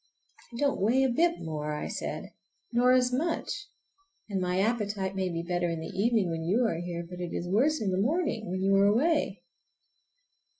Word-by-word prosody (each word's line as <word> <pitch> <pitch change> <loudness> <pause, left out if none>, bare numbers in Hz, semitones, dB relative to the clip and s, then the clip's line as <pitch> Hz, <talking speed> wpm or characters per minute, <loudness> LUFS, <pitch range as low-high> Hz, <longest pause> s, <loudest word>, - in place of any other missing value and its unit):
"I - - -10
don't 280 -5 +1
weigh 245 +7 +3
a 265 - +3
bit 335 +7 +2
more," 150 -2 -3
said - - -4
I, - - -11 0.4
"nor 245 +1 +4
as 250 -1 +3
much; 330 +8 -2 0.6
and 195 -3 -2
my 180 0 0
appetite 205 -3 0
may 190 -1 0
be 170 -1 -3
better 175 0 -1
in 165 -1 -2
the 160 +4 -7
evening, 205 -2 +2
when 165 0 -3
you 210 +9 +2
are 165 -7 0
here, 170 -1 -4
but 180 0 -9
it 175 - -4
is 175 - -3
worse 270 +11 +2
in 205 -3 -1
the 185 +1 +1
morning 270 - 0
when 185 +1 -2
you 195 0 +4
are 200 - +5
away." 230 - +1
200 Hz, 200 wpm, -29 LUFS, 180-250 Hz, 0.6 s, are